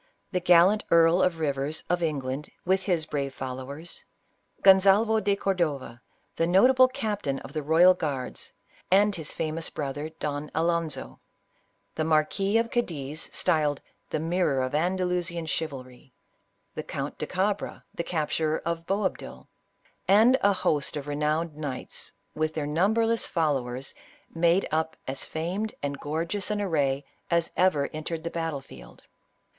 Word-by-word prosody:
The 185 Hz, -, +1 dB
gallant 180 Hz, +4 st, +5 dB
Earl 170 Hz, +2 st, +5 dB
of 180 Hz, -3 st, +2 dB
Rivers, 145 Hz, 0 st, -1 dB
of 175 Hz, 0 st, 0 dB
England, 145 Hz, -3 st, -2 dB, 0.2 s
with 190 Hz, +1 st, +2 dB
his 175 Hz, -5 st, +1 dB
brave 140 Hz, -3 st, -3 dB
followers; 135 Hz, +5 st, -6 dB, 0.6 s
Gonsalvo 200 Hz, +3 st, +6 dB
de 200 Hz, -1 st, +1 dB
Cordova, 155 Hz, -12 st, -2 dB, 0.4 s
the 165 Hz, -, +2 dB
notable 255 Hz, +8 st, +6 dB
captain 210 Hz, -, -2 dB
of -, -, -10 dB
the 155 Hz, -, -2 dB
royal 165 Hz, +5 st, +6 dB
guards, 140 Hz, -7 st, -4 dB, 0.4 s
and 205 Hz, +3 st, +4 dB
his 160 Hz, -3 st, -6 dB
famous 160 Hz, +1 st, -2 dB
brother 145 Hz, +1 st, -4 dB
Don 150 Hz, -2 st, -4 dB
Alonzo; 165 Hz, -1 st, -1 dB, 0.7 s
the 160 Hz, -, -1 dB
Marquis 160 Hz, +7 st, +2 dB
of 230 Hz, 0 st, 0 dB
Cadiz, 155 Hz, -, -3 dB
styled 150 Hz, -5 st, +1 dB
" -, -, -45 dB
the -, -, -1 dB
Mirror 160 Hz, -5 st, +1 dB
of 130 Hz, -, -3 dB
Andalusian 175 Hz, 0 st, 0 dB
Chivalry 135 Hz, -4 st, -5 dB, 0.3 s
;" -, -, -46 dB
the -, -, -4 dB
Count -, -, -5 dB
de -, -, -3 dB
Cabra, 195 Hz, +2 st, -2 dB
the 170 Hz, -, -3 dB
capturer 155 Hz, -1 st, -1 dB
of 170 Hz, 0 st, -3 dB
Boabdil, 195 Hz, 0 st, -3 dB, 0.6 s
and 220 Hz, +6 st, +6 dB
a 200 Hz, -, +5 dB
host 150 Hz, -6 st, 0 dB
of 145 Hz, 0 st, -6 dB
renowned 150 Hz, +2 st, -1 dB
knights, 145 Hz, -4 st, -5 dB, 0.2 s
with 155 Hz, 0 st, -1 dB
their 155 Hz, -2 st, -1 dB
numberless 220 Hz, +9 st, +2 dB
fol 160 Hz, -4 st, +1 dB
lowers, 125 Hz, 0 st, -4 dB, 0.4 s
made 170 Hz, +3 st, +3 dB
up 160 Hz, +1 st, -1 dB
as 135 Hz, 0 st, -2 dB
famed 185 Hz, +7 st, -3 dB
and 140 Hz, -1 st, -3 dB
gorgeous 165 Hz, +7 st, -2 dB
an 210 Hz, -1 st, -1 dB
array 145 Hz, -8 st, 0 dB, 0.2 s
as 170 Hz, -1 st, +1 dB
ever 165 Hz, -6 st, +3 dB
entered 155 Hz, +1 st, -4 dB
the 170 Hz, -, -4 dB
battle 165 Hz, -4 st, -3 dB
field. 65 Hz, -, -14 dB
165 Hz, 145 wpm, -27 LUFS, 145-185 Hz, 0.7 s, Gonsalvo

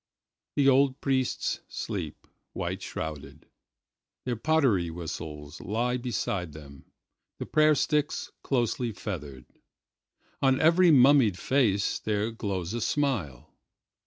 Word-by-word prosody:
The 140 Hz, -1 st, +3 dB
old 135 Hz, 0 st, +4 dB
priests 130 Hz, -2 st, 0 dB
sleep, -, -, -5 dB, 0.3 s
white -, -, -3 dB
shrouded; 75 Hz, -3 st, -6 dB, 0.8 s
Their 125 Hz, -1 st, -1 dB
pottery 120 Hz, -, +2 dB
whistles 80 Hz, -3 st, -7 dB
lie 120 Hz, +4 st, -1 dB
beside 100 Hz, -, -3 dB
them, 70 Hz, -2 st, -12 dB, 0.5 s
the -, -, -5 dB
prayer 155 Hz, 0 st, +4 dB
sticks 150 Hz, 0 st, 0 dB
closely 120 Hz, -2 st, -1 dB
feathered. 75 Hz, -, -6 dB, 1.0 s
On 135 Hz, -1 st, +3 dB
every 170 Hz, +3 st, +5 dB
mummied 130 Hz, -, +6 dB
face 105 Hz, -3 st, +1 dB
there 105 Hz, +1 st, -1 dB
glows 100 Hz, -4 st, -3 dB
a 120 Hz, -, -2 dB
smile. 105 Hz, -, -2 dB
115 Hz, 105 wpm, -28 LUFS, 85-135 Hz, 1.0 s, mummied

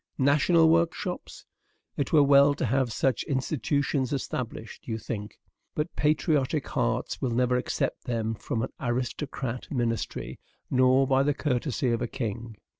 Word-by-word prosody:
"National 155 Hz, +4 st, +4 dB
workshops! 170 Hz, +2 st, 0 dB, 0.5 s
it 140 Hz, -, -2 dB
were 150 Hz, -3 st, +6 dB
well 140 Hz, 0 st, +6 dB
to -, -, -1 dB
have 130 Hz, +1 st, +1 dB
such 130 Hz, +2 st, +1 dB
institutions 140 Hz, -1 st, 0 dB
established," 125 Hz, -5 st, -5 dB
you 110 Hz, -2 st, -2 dB
think; 105 Hz, -2 st, -6 dB, 0.4 s
"but 150 Hz, +3 st, -2 dB
patriotic 150 Hz, -1 st, +1 dB
hearts -, -, -1 dB
never 125 Hz, 0 st, +1 dB
will 125 Hz, -, +3 dB
accept -, -, -2 dB
them 115 Hz, -3 st, -1 dB
from 110 Hz, +1 st, -3 dB
an 130 Hz, -, -3 dB
aristocratic 125 Hz, 0 st, -3 dB
ministry, 120 Hz, -4 st, -2 dB, 0.3 s
nor 130 Hz, +1 st, +4 dB
by 135 Hz, 0 st, +3 dB
the 145 Hz, 0 st, +1 dB
courtesy 130 Hz, -2 st, -1 dB
of 115 Hz, -, 0 dB
a -, -, -1 dB
king." 115 Hz, -2 st, -5 dB
130 Hz, 140 wpm, -27 LUFS, 120-145 Hz, 0.5 s, were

